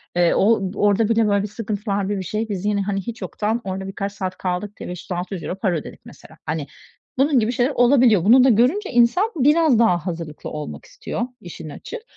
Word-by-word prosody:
eee, 175 -1 +3
o 195 -2 +2
orada 205 +2 +2
bile, 225 -1 +3
böyle, 200 0 +1
sıkıntılar 205 -2 -3
bi 205 - -1
bi 190 - -4
şey. 215 +5 -3
Biz 195 -1 -4
yine, 205 -1 +1
hani, 195 0 -2
hiç 230 +2 -7
yoktan, 210 +5 -2
orada 190 0 -4
birkaç 200 +1 -4
saat 185 -2 -4
kaldık 190 +3 -3
diye, - - -7
€500-600 180 0 -5
para 185 -5 +1
ödedik, 150 - -9
mesela. - - -15
Hani, 150 -2 -3 0.5
bunun 275 0 +3
gibi 225 +1 0
şeyler 250 +3 +1
olabiliyor. 245 -7 +4
Bunu 250 +4 +7
da 265 - +5
görünce, 255 - +2
insan 245 - +3
biraz 295 -2 +4
daha 180 -8 +3
hazırlıklı 165 -3 -5
olmak 150 -1 -7
istiyor, - - -6 0.2
işin 165 -2 -9
açığı. 440 - -8
205 Hz, 190 wpm, -21 LUFS, 185-240 Hz, 0.5 s, Bunu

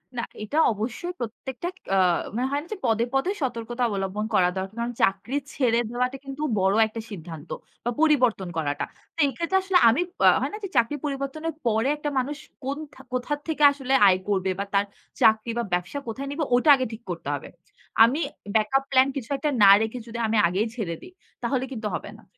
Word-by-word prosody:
না, 235 - -2 0.2
এটা 220 +9 -3 0.2
অবশ্যই 235 - -4
প্রত্যেকটা 245 +6 -5 0.3
আ - - +3 0.4
মানে 255 +2 0
হয় 285 +1 0
না - - -15
যে 425 - -6
পদে, 225 0 +2
পদে 270 +8 +1
সতর্কতা 240 -1 -3
অবলম্বন 200 0 -2
করা 180 -1 +4
দরকার। 190 +3 -4
কারণ 235 +1 -2
চাকরি 195 +8 +1 0.2
ছেড়ে 235 -4 +2
দেওয়াটা 250 +2 -1
কিন্তু 275 +2 -7 0.2
বড় 190 +2 +3
একটা 225 +1 -6
সিদ্ধান্ত। 165 -5 -9 0.4
বা 240 - +1
পরিবর্তন 255 - +3
করাটা। 145 -2 -1 0.3
তো - - -12
এক্ষেত্রে 335 +8 0
আসলে 380 -1 +3
আমি 255 +9 +2 0.3
আ - - +10
হয় - - -1
না - - -4
যে 390 - -3
চাকরি 235 +5 +3
পরিবর্তনের 285 +3 -3
পরে 225 +2 +2
একটা 295 0 -3
মানুষ 280 +3 -3 0.3
কোন 275 +2 -2 0.4
কোথা 255 +4 -1
থেকে 305 -2 0
আসলে 270 -2 -3
আয় 185 -1 +4
করবে 190 -2 +1
বা 200 - -1
তার 200 +1 +3 0.4
চাকরি 220 +1 +4
বা 235 - 0
ব্যবসা 180 +11 -1
কোথায় 265 +5 -4
নিবে 305 +2 -2
ওটা 270 +5 +3
আগে 260 - -1
ঠিক 225 - -8
করতে 170 -4 -6
হবে। 140 - -8 0.5
আমি 255 +7 +3 0.4
ব্যাকআপ 245 +6 +3
প্ল্যান 260 0 +5
কিছু 260 -5 -5
একটা 295 +3 -1
না 195 - +9
রেখে 220 +3 -2
যদি 235 0 -6
আমি 225 - +1
আগেই 195 +6 0
ছেড়ে 185 -8 -3
দিই, 365 - -13 0.3
তাহলে 255 +2 0
কিন্তু 220 -4 -4
হবে - - -6
না। 220 - -18
240 Hz, 195 wpm, -25 LUFS, 210-275 Hz, 0.5 s, আ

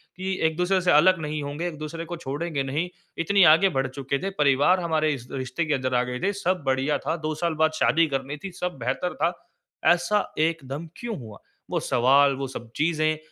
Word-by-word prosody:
कि 190 +1 -3
एक-दूसरे 180 +4 +1
से 180 - +3
अलग 170 +4 +5
नहीं 150 0 -3
होंगे, 145 +5 -3
एक-दूसरे 160 +1 -6
को 175 +1 -6
छोड़ेंगे 145 0 -3
नहीं, 150 +6 -2 0.3
इतनी 195 +3 +3
आगे 195 +5 +4
बढ़ 135 0 +1
चुके 135 +1 -3
थे। 195 - 0
परिवार 145 +6 +4
हमारे 160 -3 +1
इस 125 -3 -8
रिश्ते 130 +4 -3
के 150 - 0
अंदर 130 -1 -1
आ 125 - +3
गए 125 0 -4
थे, 200 +7 +1
सब 185 -4 -1
बढ़िया 135 +2 +1
था, - - -2
2 155 -1 -3
साल 170 +1 -1
बाद 160 - +3
शादी 165 +1 +4
करनी 140 +1 -3
थी, 195 - -5
सब 180 -4 -2
बेहतर 130 +9 -2
था। 165 +3 +1 0.6
ऐसा 180 +4 0
एकदम 155 -1 -1
क्यों 235 -2 -5
हुआ? 110 -4 -10 0.3
वो - - 0
सवाल, 135 +3 +4
वो 135 0 -4
सब 120 -3 -9
चीज़ें 155 0 +1
155 Hz, 205 wpm, -25 LUFS, 135-175 Hz, 0.6 s, अलग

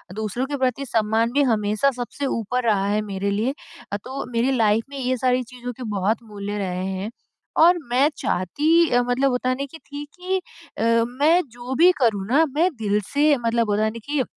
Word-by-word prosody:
दूसरों 220 +4 -2
के 285 +1 -4
प्रति 260 +1 0
सम्मान 225 -1 +1
भी 285 - +3
हमेशा 215 +1 +2
सबसे 250 +3 -5
ऊपर 250 0 -1
रहा 200 -4 +2
है 210 +1 +1
मेरे 200 -1 -3
लिए 225 +7 0 0.5
तो 265 +1 -5
मेरी 235 +3 +1
लाइफ 220 0 +3
में 280 - -8
ये 255 -1 0
सारी 255 0 +1
चीज़ों 245 0 -7
के 255 - -7
बहुत 205 +4 0
मूल्य 205 -1 -6
रहे 185 -2 -2
हैं, 190 +2 -3 0.5
और 350 +2 +6
मैं 270 +5 +4
चाहती 295 - +2
मतलब 245 +2 +1
होता 250 +1 0
है 255 - +1
न 280 - -5
की 325 - -9
थी 290 +1 -8
कि 370 +1 0 0.4
अ, - - -1 0.2
मैं 295 +8 +3
जो 245 +2 -6
भी 365 - +8
करूँ 205 -5 +2
ना 300 +7 +4
मैं 340 +4 +3
दिल 205 0 +1
से 295 +1 +4
मतलब 230 -1 +1
होता 210 +1 +2
है 220 - +2
न - - -7
की, 290 -2 0
245 Hz, 200 wpm, -23 LUFS, 210-275 Hz, 0.5 s, भी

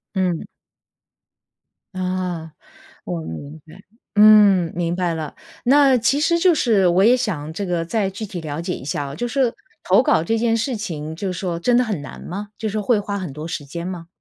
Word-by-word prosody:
嗯。 180 -3 0 1.5
啊， 180 -3 -3 0.5
我 85 -3 -4
明 140 - -8
白。 190 +5 -14 0.3
嗯， 205 -5 +6
明 175 0 -1
白 180 -2 0
了。 155 -3 -5 0.3
那 270 0 +5
其 245 +5 +2
实 340 +3 +2
就 350 0 +4
是 215 - +3
我 180 +3 +4
也 240 +3 +6
想 165 -11 -3
这 200 +3 -3
个 175 -2 -1
再 195 +2 0
具 205 +3 -6
体 185 -4 -6
了 155 0 -5
解 180 +1 -3
一 - - -7
下 145 0 -2
啊， 140 +1 -7
就 240 +8 -2
是 250 -1 +1 0.3
投 - - +4
稿 295 - +3
这 225 +6 0
件 230 0 +2
事 235 +3 -1
情 160 -7 -5
就 195 +3 -4
是 - - -6
说 175 -3 -3
真 245 +6 +3
的 250 - +4
很 205 -10 -3
难 - - -10
吗？ 205 +4 -6
就 220 - -3
是 205 - -7
说 215 - -1
会 220 0 +2
花 200 0 -3
很 180 -7 -5
多 150 +2 -6
时 145 -3 -5
间 170 +5 -6
吗？ 175 -3 -6
185 Hz, 225 characters per minute, -21 LUFS, 165-220 Hz, 1.5 s, 嗯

